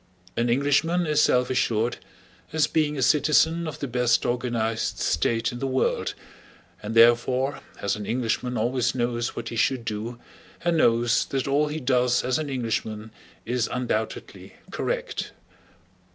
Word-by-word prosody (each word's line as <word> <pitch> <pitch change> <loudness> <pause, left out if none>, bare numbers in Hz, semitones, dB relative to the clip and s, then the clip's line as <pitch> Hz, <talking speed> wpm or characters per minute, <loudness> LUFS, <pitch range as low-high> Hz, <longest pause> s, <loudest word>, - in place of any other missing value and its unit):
An 120 +1 0
Englishman 145 +7 +2
is 150 -1 +2
self 125 +1 +2
assured, 120 -2 0 0.5
as 155 -1 +3
being 150 -2 0
a 135 - 0
citizen 155 +5 +3
of 155 - -5
the 140 - -4
best 125 -1 +1
organized 120 -2 -1
state 115 +8 0
in 120 - -7
the 135 - -2
world, 130 0 0 0.7
and 105 +2 -5
therefore 120 +4 +4 0.2
as 100 - +1
an 105 -1 -7
Englishman 125 +1 -1
always 120 +3 0
knows 120 -1 -1
what 115 -1 -5
he - - -6
should 120 +1 +1
do 115 +2 -4 0.5
and 170 -1 +2
knows 120 -4 +3
that 135 -1 -2
all 145 +2 +2
he 150 +1 -4
does 125 -2 +2
as 125 +2 0
an 155 -2 -3
Englishman 110 -4 -3 0.3
is 120 0 -1
undoubtedly 115 -3 -4 0.2
correct. - - -3
125 Hz, 150 wpm, -25 LUFS, 115-140 Hz, 0.7 s, therefore